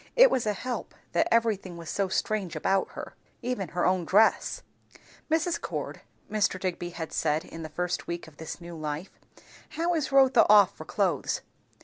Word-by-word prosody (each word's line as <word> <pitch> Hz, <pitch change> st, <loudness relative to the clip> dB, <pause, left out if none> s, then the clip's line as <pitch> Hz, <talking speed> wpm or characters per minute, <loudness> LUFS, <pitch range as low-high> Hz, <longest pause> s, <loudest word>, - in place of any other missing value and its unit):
It -, -, +8 dB
was 245 Hz, -4 st, +1 dB
a 210 Hz, -, +2 dB
help, 250 Hz, +4 st, -5 dB, 0.2 s
that -, -, +2 dB
everything 210 Hz, -6 st, +1 dB
was 165 Hz, -1 st, -9 dB
so 195 Hz, +3 st, 0 dB
strange 190 Hz, -2 st, -1 dB
about 190 Hz, +5 st, 0 dB
her. -, -, -7 dB, 0.3 s
Even 240 Hz, -6 st, -2 dB
her 175 Hz, +1 st, -1 dB
own 185 Hz, -1 st, +2 dB
dress. 210 Hz, +6 st, +3 dB, 0.7 s
"Mrs. 325 Hz, +2 st, +1 dB
Cord," -, -, -4 dB, 0.3 s
Mr. 205 Hz, -3 st, +1 dB
Digby 175 Hz, -2 st, -3 dB
had 165 Hz, -2 st, -6 dB
said 155 Hz, +2 st, 0 dB
in 165 Hz, -, -9 dB
the 155 Hz, -, -6 dB
first 180 Hz, +3 st, -2 dB
week 170 Hz, -1 st, -4 dB
of 150 Hz, -3 st, -16 dB
this 160 Hz, -, -7 dB
new 170 Hz, -1 st, -9 dB
life, 155 Hz, +3 st, -4 dB, 0.7 s
"how 340 Hz, +2 st, +1 dB
is 310 Hz, -5 st, -1 dB
Rotha 265 Hz, -3 st, +6 dB
off 205 Hz, -2 st, +7 dB
for -, -, -9 dB
clothes?" -, -, 0 dB
190 Hz, 175 wpm, -28 LUFS, 170-230 Hz, 0.7 s, It